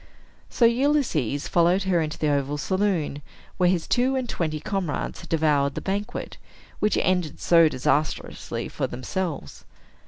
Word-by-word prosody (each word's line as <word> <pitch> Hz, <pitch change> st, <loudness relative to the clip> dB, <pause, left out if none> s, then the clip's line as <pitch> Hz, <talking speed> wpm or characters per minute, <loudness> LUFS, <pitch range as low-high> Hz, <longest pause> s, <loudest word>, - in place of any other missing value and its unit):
So 235 Hz, -, +3 dB
Ulysses 235 Hz, -, +1 dB
followed 175 Hz, +3 st, +3 dB
her 180 Hz, -3 st, +2 dB
into 155 Hz, -1 st, -3 dB
the 155 Hz, -, 0 dB
oval 140 Hz, 0 st, 0 dB
saloon, 185 Hz, -4 st, -1 dB, 0.4 s
where 180 Hz, -1 st, +4 dB
his 175 Hz, -3 st, 0 dB
two 255 Hz, +2 st, +2 dB
and 260 Hz, -2 st, -1 dB
twenty 155 Hz, -7 st, -2 dB
comrades 190 Hz, -4 st, -3 dB
had -, -, -12 dB
devoured 150 Hz, -3 st, +2 dB
the -, -, -2 dB
banquet, 200 Hz, +2 st, -4 dB, 0.4 s
which 210 Hz, -, +2 dB
ended 180 Hz, -4 st, 0 dB
so 165 Hz, -2 st, +5 dB
disastrously 145 Hz, +3 st, -1 dB
for -, -, -3 dB
themselves. 140 Hz, -, -4 dB
170 Hz, 145 wpm, -25 LUFS, 150-195 Hz, 0.4 s, so